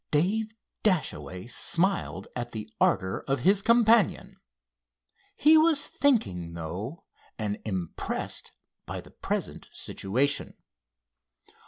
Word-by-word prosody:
Dave 215 +8 +1 0.3
Dashaway 150 - 0
smiled 175 +9 0
at 120 -1 -4
the 110 -1 -5
ardor 95 0 +2
of 135 -2 0
his 195 +7 +4
companion. 230 -2 +4 1.0
He 310 +2 +6
was 315 -3 +3
thinking, 90 - +1
though, 95 - -5 0.3
and 105 -2 -2
impressed 95 -6 -4 0.4
by - - -4
the - - -16
present - - -3
situation. 130 +9 -1
145 Hz, 100 wpm, -28 LUFS, -, 1.0 s, He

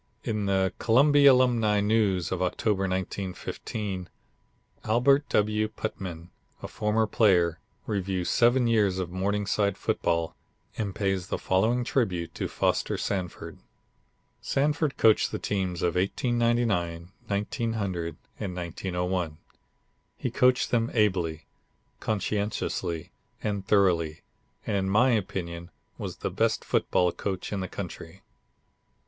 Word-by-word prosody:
In 105 -3 -1
the 95 -1 +1
Columbia 140 +4 +6
Alumni 120 -5 +3
News 100 -4 +1
of - - -2
October, 95 +2 0
1915, 95 +1 -4 0.7
Albert 135 +6 +3
W. 105 +1 +2
Putnam, 90 -6 -6 0.3
a - - -3
former 110 +1 0
player, 90 -7 +3 0.3
reviews 95 -3 -2
seven 120 +1 +4
years 105 -5 +2
of 90 -2 -3
Morningside 100 +1 0
football, 85 -3 -1 0.4
and 100 -3 -3
pays 95 -3 -1
the - - -2
following 110 +7 +1
tribute 95 -10 -1
to - - -3
Foster - - 0
Sanford: 95 -3 -4 0.8
"Sanford 150 +1 0
coached 110 -1 +4
the - - -2
teams 95 -3 -2
of 85 -1 +2
1899, 100 -4 0 0.2
1900 100 -5 -2 0.2
and 95 -4 -4
1901. 90 -1 -3 0.8
He - - -3
coached 125 0 +3
them 115 -1 +2
ably, 90 -7 +1 0.5
conscientiously 100 -5 -2 0.3
and 100 -2 -2
thoroughly, 85 -7 +2 0.4
and - - -1
in 95 -1 0
my 120 +6 +4
opinion 85 -5 -3 0.3
was - - -5
the - - -3
best - - 0
football 90 -1 +2
coach 95 +2 -4
in 100 - -1
the 95 - -3
country." - - -8
100 Hz, 115 wpm, -27 LUFS, 90-110 Hz, 0.8 s, Columbia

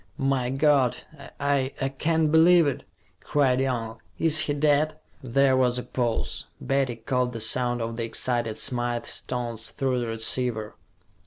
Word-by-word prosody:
"My 135 -2 0
God! 135 -2 +2 0.4
I 140 -1 0
I 135 - -1
can't 155 +3 0
believe 165 +1 +6
it!" 140 -3 -2 0.3
cried 130 -3 +1
Young. 120 -4 -3 0.2
"Is 160 -1 +3
he 145 - 0
dead?" 150 +1 +2 0.3
There 135 +1 +2
was 125 -1 +2
a 125 - -3
pause; 120 -3 -2
Betty 135 -3 0
caught 125 +2 -1
the 115 - -5
sound 120 +1 +2
of 115 0 -5
the 115 - -2
excited 115 0 -1
Smythe's 120 -1 -1
tones 120 -3 -4
through 130 -3 -1
the 120 - -3
receiver. 115 -1 0
130 Hz, 150 wpm, -25 LUFS, 120-140 Hz, 0.4 s, believe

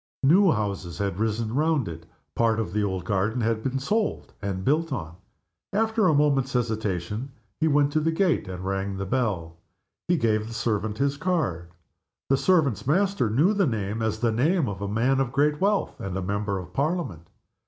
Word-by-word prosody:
New 180 +7 +6
houses 100 - -2
had 100 -1 -2
risen 110 0 -1
round 150 -2 +1
it, 85 0 -8 0.3
part 115 -1 +2
of 100 -6 -3
the 105 0 +1
old 95 -3 -2
garden 105 +5 0
had 115 -1 0
been 135 +3 -1
sold 210 +11 -1
and 95 -2 -3
built 155 +3 +1
on. 85 -11 -4 0.6
After 220 0 +2
a 160 - +4
moment's 140 -2 +2
hesitation 110 0 -2 0.3
he 160 - +2
went 145 -1 +3
to 155 - +2
the 160 +1 +1
gate 170 - +1
and 90 0 -6
rang 95 0 -2
the 95 - -3
bell. 95 -9 -1 0.5
He 175 0 +3
gave 110 -4 +1
the 115 - -7
servant 110 -2 -1
his 140 0 0
card. 150 - -1 0.6
The 135 - +4
servant's 145 - +2
master 190 - +2
knew 150 - +3
the 200 -4 +2
name 110 -2 -2
as 110 -1 0
the 120 -2 +2
name 150 +7 +2
of 100 -1 -5
a 100 - -2
man 120 +6 +1
of 135 -3 0
great 150 +3 +1
wealth, 200 +1 +1
and 95 -1 -4
of 95 - -3
a - - -5
Member 100 0 -1
of 90 -2 -8
Parliament. 140 - -2
115 Hz, 195 wpm, -25 LUFS, 100-150 Hz, 0.6 s, New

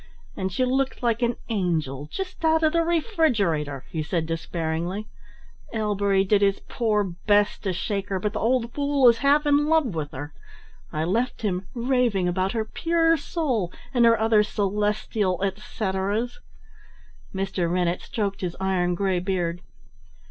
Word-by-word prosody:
"And 190 0 -2
she 255 +8 +1
looked 265 0 -1
like 235 0 +1
an 240 -1 +1
angel 160 - -1
just 370 -3 -6
out 320 0 +3
of 310 - +3
the 335 - +3
refrigerator," 230 - 0
he 160 - -2
said 160 +1 -1
despairingly. 165 +4 -3 0.7
"Ellbery 200 -3 +1
did 200 +1 +2
his 200 -1 +2
poor 215 -4 0
best 205 +3 +1
to 190 - +1
shake 195 +2 -3
her, 190 -1 -1
but 210 +3 -2
the - - -2
old 235 0 +1
fool 285 -2 +3
is 230 -1 +2
half 285 +2 +3
in 290 0 +3
love 310 - +2
with 155 -3 -3
her 145 +3 -7 0.6
I 155 - -1
left 225 +9 -1
him 185 -2 -1
raving 240 -6 +1
about 185 +2 0
her 220 -2 -1
pure 330 +6 +2
soul 275 - -1 0.2
and 245 -2 +4
her 230 -1 +5
other 220 -1 +4
celestial 205 -2 0
etceteras." 200 - -2 0.9
Mr. 190 -3 -1
Rennett 175 0 0
stroked 200 -3 -3
his 175 -2 -3
iron 180 -2 +1
grey 190 -1 +1
beard. 175 -2 -2
205 Hz, 155 wpm, -25 LUFS, 180-245 Hz, 0.9 s, her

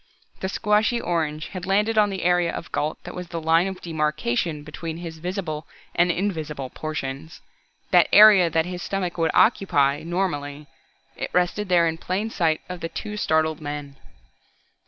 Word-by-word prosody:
The 190 - -3
squashy 210 +4 +1
orange 155 -6 -2
had 185 -2 -7
landed 210 +3 +2
on 210 -1 +4
the 190 -1 -4
area 175 -1 +2
of - - -7
Gault 150 +1 -1
that - - -8
was 180 -1 -6
the 170 0 -5
line 165 +3 +3
of 190 -1 -6
demarkation 150 -2 -1
between 160 +2 -6
his 165 -2 -8
visible 170 -3 -4 0.3
and 175 +1 +3
invisible 155 -8 -3
portions 155 0 -5 0.5
the - - +5
area 205 -5 +8
that 160 0 +1
his 180 0 -6
stomach 180 -3 -3
would 165 -1 +2
occupy 145 - +3
normally. 150 -5 -3 0.5
It - - -4
rested 180 +3 0
there 175 -2 +4
in 160 0 -3
plain 200 +6 -2
sight 160 -6 +1
of 180 -1 -6
the 165 - -4
two 210 +3 -6
startled 160 -5 +1
men. 145 -1 -6
170 Hz, 165 wpm, -24 LUFS, 155-190 Hz, 0.5 s, area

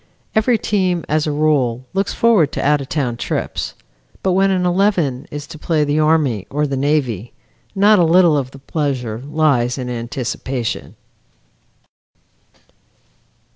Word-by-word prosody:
Every 225 +2 +3
team, 185 -6 0
as 155 +1 0
a - - 0
rule, 140 -5 +1
looks 195 +1 0
forward 215 -11 +3
to - - -2
out 145 0 +3
of 135 - -8
town 130 -6 -1
trips, - - -3 0.5
but 190 - +2
when 195 +2 +3
an 185 -2 +1
eleven 175 -8 +1
is 145 0 -6
to 155 +1 -11
play 155 -2 +1
the 145 +1 0
Army 150 - +1
or 150 +2 0
the 140 -1 -2
Navy, 130 -6 -1 0.4
not 205 +1 +5
a - - +5
little 170 -1 +5
of 135 -3 -1
the 135 - -13
pleasure 135 -5 -3
lies 140 -4 +1
in 125 -2 -4
anticipation. 120 +1 -4
150 Hz, 145 wpm, -18 LUFS, 130-175 Hz, 0.5 s, not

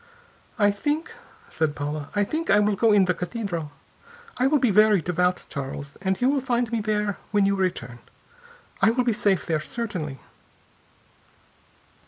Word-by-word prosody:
"I 205 -2 +4
think," 295 +11 -2 0.4
said 155 -2 -1
Paula, 145 0 -4
"I 205 - +3
think 315 +10 -3
I 205 - +6
will 210 0 +2
go 225 +2 +3
in 200 -2 +5
the 180 - +1
cathedral. 180 -4 -4 0.7
I 255 - +4
will 295 +2 +3
be 250 -5 +2
very 210 0 +5
devout, 180 +2 0
Charles, 140 0 -6
and 190 0 0
you 250 - +2
will 275 0 +2
find 240 -2 0
me 230 -2 0
there 210 -1 -1
when 205 -2 +2
you 200 0 +2
return. 170 -11 -2 0.8
I - - +6
will 250 +2 +1
be 240 -2 +1
safe 205 -3 +1
there, 160 -2 0
certainly." 160 - -4
205 Hz, 165 wpm, -24 LUFS, 170-230 Hz, 0.8 s, I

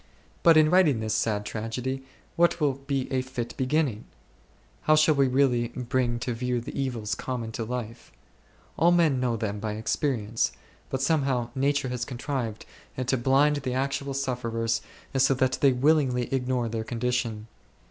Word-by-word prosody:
But 165 -2 +6
in 155 0 +5
writing 170 -10 +4
this 110 -1 -2
sad 105 -2 0
tragedy 125 +5 -4 0.3
what 170 0 +3
will 145 -3 +2
be 135 -2 -1
a 130 - +2
fit 125 -2 -5
beginning? 130 -4 0 0.8
How 155 - +6
shall 155 0 +5
we 140 -2 +3
really 125 -2 +2
bring 125 0 -1
to 125 - -2
view 125 +1 -1
the 120 - -8
evils 120 -6 -2
common 120 -3 -4
to 115 - -4
life? 120 0 -6 0.7
All 170 - +5
men 165 -6 +3
know 120 -2 0
them 105 -1 -3
by 105 0 -3
experience, 110 - -1 0.4
but 130 0 -2
somehow 135 -5 +1
nature 140 0 0
has 125 -1 -3
con 125 -1 -6
trived 120 -5 -3 0.4
to 130 - +1
blind 135 +4 +3
the 130 -3 -3
actual 135 +1 -2
sufferers 115 -4 -1 0.4
so 135 +1 +4
that 130 0 +1
they 140 - +6
willingly 130 -2 +2
ignore 125 -2 0
their 115 0 -3
condition. 120 -2 -2
125 Hz, 160 wpm, -27 LUFS, 115-140 Hz, 0.8 s, But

